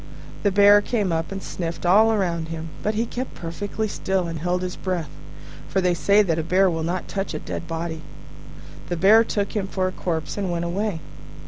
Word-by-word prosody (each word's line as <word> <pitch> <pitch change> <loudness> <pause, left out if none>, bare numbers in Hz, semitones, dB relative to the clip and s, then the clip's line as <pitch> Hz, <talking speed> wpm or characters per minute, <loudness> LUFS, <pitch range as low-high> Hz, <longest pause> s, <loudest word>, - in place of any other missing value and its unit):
The 205 - +3
Bear 205 +1 +7
came 205 -4 -1
up 165 +1 -1
and 195 0 -5
sniffed 170 -1 -5
all 215 +5 +6
round 170 -4 -1
him, 165 0 -6
but 215 +1 -1
he 225 +2 +1
kept 250 +2 -5
perfectly 205 +6 -4
still 190 -2 -1
and 165 -1 -4
held 180 +2 -1
his 180 0 -3
breath: 175 -6 -3 0.6
for 190 - 0
they 180 -1 +2
say 200 +5 +4
that 165 -4 0
a - - -1
bear 185 +3 +3
will 165 -1 -2
not 175 +3 -2
touch 195 0 -3
a - - -1
dead 170 - -6
body. 165 0 -4 0.9
The 175 - -1
Bear 210 +6 +6
took 205 -3 -2
him 200 -2 -1
for 185 -1 -1
a - - -2
corpse, 165 -2 -3
and 195 -2 -1
went 170 0 -1
away. 185 0 -2
185 Hz, 210 wpm, -23 LUFS, 170-200 Hz, 0.9 s, Bear